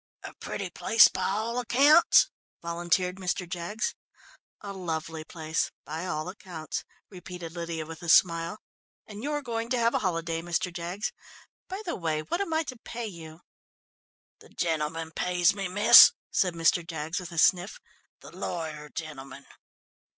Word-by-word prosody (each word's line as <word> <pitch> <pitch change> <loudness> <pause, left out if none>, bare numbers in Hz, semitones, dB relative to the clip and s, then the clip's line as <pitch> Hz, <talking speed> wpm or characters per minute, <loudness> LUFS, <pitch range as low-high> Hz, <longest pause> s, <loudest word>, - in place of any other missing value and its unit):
"A - - -8
pretty - - -6
place 225 - +6
by - - -2
all 220 +5 -1
accounts," 275 +7 +5 0.3
volunteered 175 +2 0
Mr. 180 -1 -2
Jaggs. 180 +6 -3 0.7
"A 200 -1 -7
lovely 160 -3 -4
place 160 -1 -2 0.2
by 160 +4 -5
all 155 -2 -3
accounts," 180 -4 -6 0.3
repeated 180 -2 -8
Lydia 165 -2 -5
with 160 0 -10
a 170 - -5
smile. 165 +2 +4 0.5
"And 210 0 -9
you're 295 +2 -2
going 230 -2 -3
to 255 - +1
have 230 0 +2
a - - +2
holiday, 165 -3 -2
Mr. 175 +1 -2
Jaggs. 175 +4 -4 0.5
By 385 +3 -6
the 340 - -2
way, 155 -3 -2
what 345 - -2
am 395 - -3
I 320 0 +1
to 255 -5 -8
pay 235 0 -6
you?" 165 -5 -10 1.0
"The - - -17
gentleman 160 -1 -2
pays 180 +1 +2
me, 195 -2 -3
miss," 205 +3 +9 0.2
said 180 -3 +1
Mr. 165 +1 +2
Jaggs 160 +1 -4
with 180 -1 -8
a 170 - -8
sniff. 180 +4 +3 0.4
"The - - -13
lawyer 155 -3 -5
gentleman." 140 -4 -8
175 Hz, 155 wpm, -28 LUFS, 165-205 Hz, 1.0 s, miss